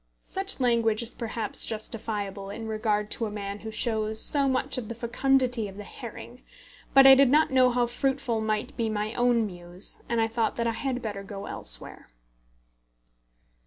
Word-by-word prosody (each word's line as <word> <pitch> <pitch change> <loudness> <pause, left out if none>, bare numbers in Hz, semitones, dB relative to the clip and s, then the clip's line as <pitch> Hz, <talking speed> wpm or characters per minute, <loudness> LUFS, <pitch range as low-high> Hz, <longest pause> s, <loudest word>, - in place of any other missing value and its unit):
Such 390 -2 -2
language 235 -3 +2
is 235 - -2
perhaps 225 -2 -3
justifiable 210 -3 -4
in 220 +2 -6
regard 215 -1 -1
to 230 - -2
a - - -5
man 200 -1 -5
who 220 - -7
shows 220 0 +1
so 280 +2 +4
much 265 +1 0
of 225 - -8
the 235 - -5
fecundity 245 -1 +1
of 195 0 -11
the 205 - -7
herring; - - -10 0.5
but 270 0 +9
I 270 - +11
did 270 -1 +6
not 300 +2 +4
know 255 -1 +5
how 245 0 +1
fruitful 245 -1 -1
might 215 -1 -2
be 230 -1 -1
my 215 0 -2
own 240 -2 +2
muse, 175 0 -5
and 235 -1 +1
I 225 - +3
thought 225 0 -1
that 235 - -1
I 230 - +2
had 255 +1 -3
better 205 -3 -4
go 195 0 -8
elsewhere. - - -3
225 Hz, 180 wpm, -27 LUFS, 210-250 Hz, 0.5 s, I